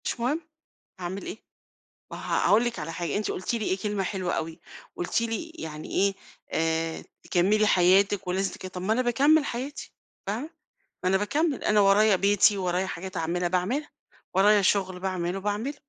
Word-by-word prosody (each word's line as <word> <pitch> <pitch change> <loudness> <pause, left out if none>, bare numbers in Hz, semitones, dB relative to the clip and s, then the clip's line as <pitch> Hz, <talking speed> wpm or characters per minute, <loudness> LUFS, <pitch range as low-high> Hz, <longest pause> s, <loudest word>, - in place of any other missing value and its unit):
مش - - -2
مهم، 270 +8 0 0.6
هاعمل 185 +2 -5
إيه! - - -6 0.7
ما - - -6
ه - - 0
هاقول 220 +3 +5
لِك 240 -1 -2
على 165 +2 -5
حاجة، 165 -2 -3
أنتِ 210 - -1
قُلتِ 185 - -2
لي 225 -2 -2
إيه، 190 - 0
كلمة 205 0 -2
حلوة 185 -2 -2
أوي، 160 0 -4 0.4
قُلتِ 175 - 0
لي 230 +8 -3
يعني 155 - -8
إيه، 195 0 +2 0.4
آآ، 165 0 -1 0.2
تكمّلي 205 +5 +2
حياتِك 190 +1 +4
ولازم 190 +2 -1
تك - - -8
طب 180 -1 -7
ما 205 +4 +1
أنا 245 +3 +2
باكمِل 280 +6 +4
حياتي 270 +3 -5 0.3
فاهمة؟ 230 +10 -3 0.5
ما - - +3
أنا 190 - +3
باكمّل، 285 - 0
أنا 210 0 +4
ورايا 200 +1 +5
بيتي، 200 +2 +4
ورايا 180 0 0
حاجات 185 +1 -6
اعملها، 175 +2 -1
باعملها. 195 - -1 0.4
ورايا 205 +2 +5
شغل 190 -2 +1
باعمله 185 -1 -2
باعمله. 210 +8 -2
195 Hz, 175 wpm, -27 LUFS, 180-220 Hz, 0.7 s, هاقول